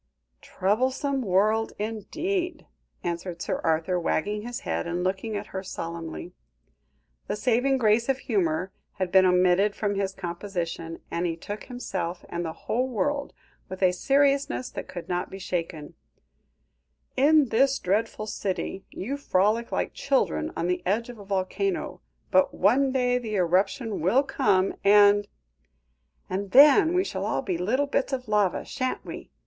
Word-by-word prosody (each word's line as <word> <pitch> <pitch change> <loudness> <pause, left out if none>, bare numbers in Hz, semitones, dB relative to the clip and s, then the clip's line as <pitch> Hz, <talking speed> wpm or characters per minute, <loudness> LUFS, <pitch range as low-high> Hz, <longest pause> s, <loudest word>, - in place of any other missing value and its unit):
"Troublesome 260 +7 0
world, 215 +2 +2
indeed," 335 - -3 0.4
answered 170 0 -4
Sir - - -2
Arthur, 165 +3 +1
wagging 205 +5 -1
his 240 +2 -6
head - - -2
and 175 +1 -2
looking 195 +4 -2
at 205 - -5
her 190 - -3
solemnly. 165 - -6 0.9
The - - -1
saving 250 +5 +2
grace 230 +1 +2
of 270 - +2
humour 185 -7 -1 0.2
had 185 -3 -3
been 190 0 +6
omitted 180 +3 +3
from 205 -1 -1
his 195 -1 -2
composition, 170 -2 -5
and 175 +1 -1
he 165 - -2
took 205 +5 -7
himself, 190 -8 -4
and 170 0 -3
the 165 - -3
whole 250 +3 0
world, 280 +4 -1 0.4
with 190 +1 -5
a 185 - +5
seriousness 275 +5 +1
that - - -6
could 175 - -8
not 180 0 -2
be 190 - -8
shaken; 170 -5 -4 1.2
"in 290 0 +4
this 270 +4 +3
dreadful 215 +2 -1
city, 190 -2 -3
you 265 +9 -4
frolic 220 -2 +1
like - - -1
children 80 - 0
on 165 - -1
the 180 0 0
edge 215 +6 0
of 240 -3 -9
a 200 - -11
volcano, 195 - -2 0.3
but 185 -1 +3
one 260 +8 +3
day 250 -1 +1
the 220 -3 -4
eruption 195 +5 +1
will 230 - +3
come, 195 -9 +1
and 205 0 +6 0.5
" 60 0 -46
"And 195 +2 -3
then 295 +5 +7
we 365 - +3
shall 195 - -4
all 210 - -1
be 180 -4 -2
little 245 +10 +1
bits 280 -1 -1
of 255 -2 -3
lava, 210 -4 +1
shan't 255 -1 -3
we?" - - -8
205 Hz, 155 wpm, -26 LUFS, 180-250 Hz, 1.2 s, then